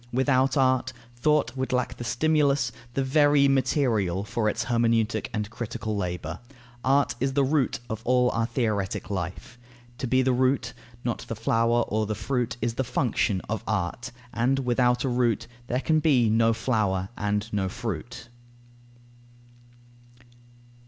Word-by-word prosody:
Without 130 +1 +2
art, 130 -1 +2 0.2
thought 135 -1 +1
would 130 0 -2
lack 125 -1 -1
the - - -6
stimulus, 140 0 +2 0.2
the 135 - +1
very 145 +1 +4
material, 115 - +1
for 110 0 0
its 115 +2 -2
hermeneutic 115 -2 +1
and 105 -2 -2
critical 110 -2 -4
labour. 90 -3 -4 0.4
Art 140 +2 +3
is 135 +1 0
the 140 - +3
root 135 -1 +1
of 110 0 -5
all 125 0 +3
our 115 0 0
theoretic 105 -5 -2
life. 95 +6 -5 0.4
To 130 - -2
be 130 +2 +3
the 130 0 +2
root, 130 -1 +1 0.3
not 120 - -2
the 115 - -4
flower 115 +2 +2
or 110 0 -1
the 110 - -2
fruit, 120 +3 -2
is 115 0 0
the 130 - -1
function 115 -6 0
of 110 0 -4
art. 110 +5 -2 0.2
And 125 +4 +1
without 125 0 +2
a - - 0
root, 120 -3 +1 0.2
there 125 +1 -1
can 155 +1 +2
be 130 -8 +3
no 115 +1 +4
flower 105 -6 0
and 105 +1 -1
no 95 -2 0
fruit. 120 +1 -6
120 Hz, 150 wpm, -26 LUFS, 110-130 Hz, 0.4 s, very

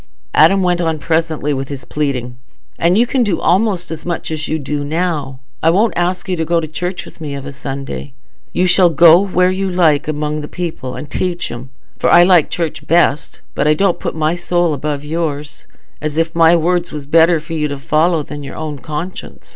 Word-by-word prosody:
Adam 195 -1 +5
went 175 -1 +1
on 165 -2 0
presently 160 -2 -1
with 135 0 -3
his 140 -2 -7
pleading, 130 -5 -3 0.4
"And 175 +3 +3
you 235 - +4
can 255 +1 0
do 205 -7 +1
almost 185 -2 +1
as 160 -1 -6
much 175 -2 -4
as 155 -1 -3
you 160 - -1
do 145 0 -3
now. 150 -3 -2 0.2
I 165 - +3
won't 210 +7 +2
ask 175 0 -1
you 185 - 0
to 160 - 0
go 170 +1 +1
to 160 - -4
church 180 +4 -4
with - - -15
me 145 -2 -4
of 140 0 -7
a 140 - -6
Sunday. 135 0 -6 0.4
You 180 - +1
shall 180 0 +5
go 165 +1 +7
where 185 -2 +2
you 190 +1 -2
like 165 -6 +2
among 150 0 -2
the 150 - -6
people, 160 -8 -5
and - - -7
teach 175 +1 -3
'em; 120 +2 -8 0.3
for - - +1
though - - +6
I 175 - +8
like 175 -4 +4
church 165 -3 -4
best, 165 -2 +1
I 150 +1 +2
don't 195 +1 +1
put - - -4
my 155 0 +1
soul 175 -1 0
above 145 0 -3
yours, 150 -2 -4 0.3
as 155 0 -3
if 165 0 0
my 165 0 +5
words 175 +1 0
was 150 -2 -6
better 165 +3 +4
for 155 +2 -9
you 150 -2 0
to 145 -1 -5
follow 155 +3 +1
than 145 0 -8
your 140 -1 -8
own 155 -2 -5
conscience. 155 +6 -7
160 Hz, 215 wpm, -16 LUFS, 150-175 Hz, 0.4 s, I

